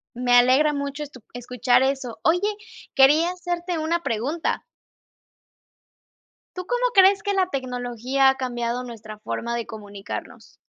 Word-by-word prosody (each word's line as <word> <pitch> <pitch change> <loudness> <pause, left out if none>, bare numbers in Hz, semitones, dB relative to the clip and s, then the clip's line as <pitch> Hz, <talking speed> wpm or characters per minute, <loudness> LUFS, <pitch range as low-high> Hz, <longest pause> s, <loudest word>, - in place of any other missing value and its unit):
Me 245 0 -1
alegra 255 +5 +5
mucho, 280 +1 -4
estu 270 -4 -12
escuchar 245 +1 +1
eso. 265 -3 -2
Oye, 340 +2 +3 0.6
quería 300 +6 +5
hacerte 350 -1 -4
una 330 +2 -1
pregunta. 280 +7 -2 2.0
¿Tú, 365 0 -5
cómo - - 0
crees 390 0 +6
que 405 - -1
la 380 -2 +2
tecnología, 255 0 0
ha 265 - +1
cambiado 245 -1 -3
nuestra 215 -3 -10
forma 235 +2 -4
de 235 - -4
comunicarnos? 205 -2 -9
265 Hz, 130 wpm, -23 LUFS, 245-330 Hz, 2.0 s, crees